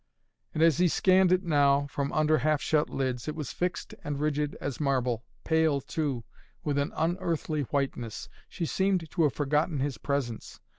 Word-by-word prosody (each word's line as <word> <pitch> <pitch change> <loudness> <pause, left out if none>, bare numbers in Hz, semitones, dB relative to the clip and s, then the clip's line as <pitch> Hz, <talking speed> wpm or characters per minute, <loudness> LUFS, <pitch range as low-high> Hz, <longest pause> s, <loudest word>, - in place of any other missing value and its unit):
And 155 - +3
as 165 -1 +4
he 180 - +5
scanned 185 +2 +4
it 185 +1 +3
now, 145 -4 +3
from 140 0 -3
under 155 0 +3
half 155 -1 +2
shut 150 +1 +1
lids, 130 -2 -2
it 155 - -3
was 150 -5 -5
fixed 180 0 -3
and 145 -1 -3
rigid 150 -1 -1
as 140 -3 -4
marble, 125 -5 0 0.2
pale, 160 -3 +2
too, 140 -4 -2 0.4
with 145 -2 0
an 140 - -1
unearthly 165 -2 -1
whiteness. 130 -6 -2 0.2
She 170 - -3
seemed 190 -1 +1
to - - 0
have 150 -4 +3
forgotten 150 +1 0
his 135 -4 -2
presence. 135 -5 -3
150 Hz, 170 wpm, -28 LUFS, 140-160 Hz, 0.4 s, he